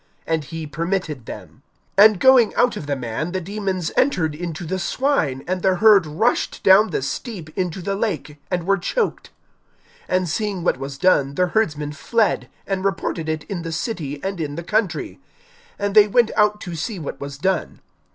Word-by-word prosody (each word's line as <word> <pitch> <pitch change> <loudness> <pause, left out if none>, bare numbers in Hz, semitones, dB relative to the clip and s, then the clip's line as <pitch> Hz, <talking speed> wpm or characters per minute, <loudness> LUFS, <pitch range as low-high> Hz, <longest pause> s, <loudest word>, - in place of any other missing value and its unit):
And 160 -2 -1
he 165 +2 -6
permitted 165 - -3
them. - - -10 0.4
(33)And 210 0 +8
going 255 +1 +5
out 245 - +3
of 145 - -6
the 145 - 0
man, 130 +7 -4
the 185 - 0
demons 190 -2 -3
entered 180 - +2
into 170 +1 -5
the 190 +4 -2
swine; 180 - 0
and 185 0 -1
the 190 0 +3
herd 200 -3 +6
rushed 195 +11 0
down 200 +3 +6
the - - -2
steep 160 - -5
into 180 -1 -2
the 195 - -1
lake, 195 -7 -3
and 180 -2 -2
were 195 0 +2
choked. 460 - -2 0.8
(34)And 185 0 +1
seeing 195 +1 -2
what 150 - +1
was 135 0 -6
done 140 -5 +2
the 180 - +3
herdsmen 150 -9 0
fled, 220 +9 0 0.2
and 195 -1 -2
reported 185 -4 -2
it 155 -1 -2
in 190 -4 -5
the 165 0 -5
city 160 - -3
and 195 -3 -3
in 145 -2 -3
the 170 - -5
country, 210 +1 -1 0.6
(35)And 200 0 -1
they 210 -1 +7
went 235 +2 +3
out 210 0 +3
to 175 - -6
see 180 +6 -4
what 155 -5 -6
was 140 -1 -6
done. 185 +3 -1
180 Hz, 185 wpm, -21 LUFS, 155-205 Hz, 0.8 s, 33)And